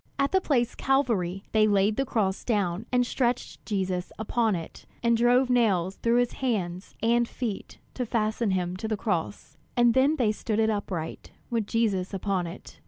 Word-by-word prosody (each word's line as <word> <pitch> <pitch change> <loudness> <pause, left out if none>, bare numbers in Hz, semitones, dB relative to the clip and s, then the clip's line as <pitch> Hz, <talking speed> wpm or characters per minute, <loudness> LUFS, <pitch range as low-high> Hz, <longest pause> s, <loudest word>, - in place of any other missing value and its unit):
At 275 0 +1
the 380 - +3
place 245 -8 +1
Calvary, 215 -9 0
they 215 -1 +4
laid 205 +1 +3
the 270 +2 -1
cross 200 -5 0
down, 205 -2 -1
and 250 -1 +3
stretched 245 -1 -1
Jesus 185 -4 -2
upon 220 -1 +1
it, 165 -2 -8 0.2
and 235 0 +4
drove 245 +3 +4
nails 200 -7 +2
through 235 0 +1
his 245 0 +2
hands 190 -8 -3
and 235 +1 +3
feet 225 -6 -5 0.2
to 250 -2 -3
fasten 220 0 0
him 180 -1 -1
to 220 - -4
the 215 -1 -1
cross; 195 -2 -3 0.2
and 240 -1 +5
then 270 +5 +4
they 235 -7 +2
stood 215 0 -3
it 220 0 +3
upright 185 -6 -4 0.2
with 225 -3 0
Jesus 200 -5 0
upon 190 -2 -1
it. 170 +4 -11
220 Hz, 175 wpm, -27 LUFS, 190-240 Hz, 0.2 s, and